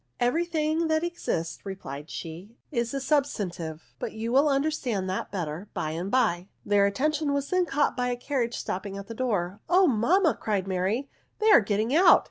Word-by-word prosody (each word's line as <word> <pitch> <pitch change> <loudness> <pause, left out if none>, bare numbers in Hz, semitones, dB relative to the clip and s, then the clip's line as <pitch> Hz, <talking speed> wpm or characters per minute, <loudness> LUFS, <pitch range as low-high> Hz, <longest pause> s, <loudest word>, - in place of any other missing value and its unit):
" - - -46
Every 330 +6 0
thing 320 0 0
that 315 0 +1
exists," 170 - -2
replied 155 -6 -7
she, 180 +8 -8
" - - -44
is 235 - -3
a 275 - -2
substantive; 180 - -2
but - - -4
you 225 +1 -3
will 280 +4 +4
understand 275 -8 0
that 185 - -3
better 175 0 -4
by 155 - -2
and 170 +4 -3
by." 200 -8 +1 0.2
Their 200 -1 +4
attention 295 +7 0
was 280 0 -2
then 365 -1 +2
caught 290 0 +1
by 250 -1 0
the 245 - 0
carriage 245 -2 -2
stopping 195 +1 -4
at 200 - -7
the 230 - -7
door. 205 -6 -1
" - - -37
Oh, 370 +2 +6
mam 305 - +3
ma," 320 - +4
cried 200 -3 -2
Mary, 195 +8 -1 0.2
" - - -43
they 435 0 +4
are - - +8
getting 215 +4 0
out. 345 +5 +7
230 Hz, 210 wpm, -27 LUFS, 190-295 Hz, 0.2 s, are